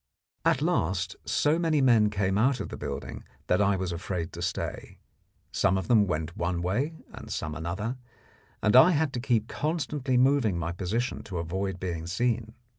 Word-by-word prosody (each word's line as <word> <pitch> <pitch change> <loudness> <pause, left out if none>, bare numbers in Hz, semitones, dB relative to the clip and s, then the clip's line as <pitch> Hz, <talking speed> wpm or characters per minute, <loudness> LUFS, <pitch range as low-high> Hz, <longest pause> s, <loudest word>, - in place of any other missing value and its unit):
At - - +2
last 90 +2 0
so 145 +8 +2
many 160 -3 +2
men 115 -6 +5
came 95 -2 0
out 125 +5 +2
of - - -4
the - - -6
building - - -6 0.2
that 90 - +2
I 100 -1 +3
was 95 -1 -2
afraid 85 0 -4
to - - -7
stay. - - -4 0.5
Some 95 - +2
of 95 - -3
them 110 -4 +5
went 80 -1 -2
one 85 0 -1
way, 125 - 0 0.2
and - - -9
some 75 - -3
another, 95 - -3 0.7
and 105 - +3
I 155 +8 +8
had 150 -2 +1
to 125 - -2
keep 120 -3 +1
constantly 145 -4 -1
moving 125 -7 +3
my 85 0 -2
position 100 +8 -2
to 95 -4 -5
avoid 95 +3 -3
being 85 -3 -4
seen. 115 +4 -1
105 Hz, 180 wpm, -28 LUFS, 90-125 Hz, 0.7 s, I